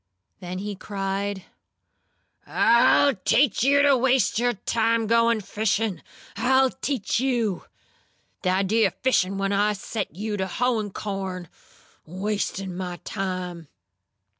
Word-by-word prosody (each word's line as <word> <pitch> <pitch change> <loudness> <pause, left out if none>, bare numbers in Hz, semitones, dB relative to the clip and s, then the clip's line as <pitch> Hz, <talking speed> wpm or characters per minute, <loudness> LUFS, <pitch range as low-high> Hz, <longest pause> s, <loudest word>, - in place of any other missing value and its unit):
Then 180 -1 -6
he 205 +2 -4
cried: 195 0 -3 1.0
"I'll 235 +4 +4
teach 240 +4 +2
you 280 +2 +4
to 285 -1 +5
waste 255 -2 +2
your 245 0 +1
time 225 +2 0
goin' 230 0 +3
fishin'! 205 -2 -1 0.4
I'll 260 0 +3
teach 260 -6 -2
you! 240 -7 -1 0.8
Th' - - -3
idea 195 +4 +2
o' - - -9
fishin' 195 -7 +2
when 195 0 -1
I 205 +1 +2
set 200 -3 -5
you 210 +2 -3
to 190 -1 -2
hoein' 230 0 -1
corn! 190 -3 -5 0.6
Wastin' 195 0 -3
my 180 -1 -5
time! 185 -4 -4
205 Hz, 120 wpm, -24 LUFS, 190-235 Hz, 1.0 s, to